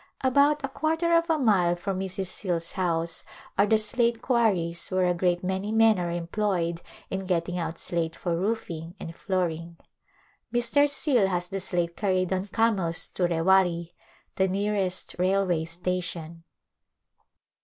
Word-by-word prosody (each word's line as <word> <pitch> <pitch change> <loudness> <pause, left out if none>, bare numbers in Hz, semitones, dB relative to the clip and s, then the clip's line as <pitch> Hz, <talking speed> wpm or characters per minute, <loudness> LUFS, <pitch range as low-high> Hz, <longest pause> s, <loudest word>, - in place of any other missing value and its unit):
About 285 +3 +3
a - - -3
quarter 320 +5 0
of 335 0 +2
a 320 - +3
mile 195 - +3
from 185 +2 -3
Mrs. 190 0 -3
Scale's 175 -3 -2
house 170 -3 -2 0.3
are 200 - +3
the 220 - +4
slate 230 +2 +1
quarries 195 -10 +1
where 185 0 +1
a 180 - +2
great 175 0 0
many 190 +3 -2
men 225 -2 +4
arc 175 -1 -2
employed 170 -1 -1 0.3
in 190 0 -3
getting 180 0 -1
out 165 0 -4
slate 165 -1 -2
for 175 -2 -2
roofing 175 -4 -3
and 165 - -7
floor 185 -3 0
ing. 165 +1 -9 0.7
Mr. 240 +5 +3
Scale 270 -7 +2
has 180 -2 -1
the 195 - -3
slate 175 -2 -2
carried 185 -3 0
on 190 +2 -2
camels 195 -6 +1
to 180 - 0
Rewari, 170 0 +2 0.4
the 190 - +3
nearest 195 -1 -1
railway 185 -3 +1
station. 170 -1 -4
185 Hz, 150 wpm, -26 LUFS, 170-215 Hz, 0.7 s, the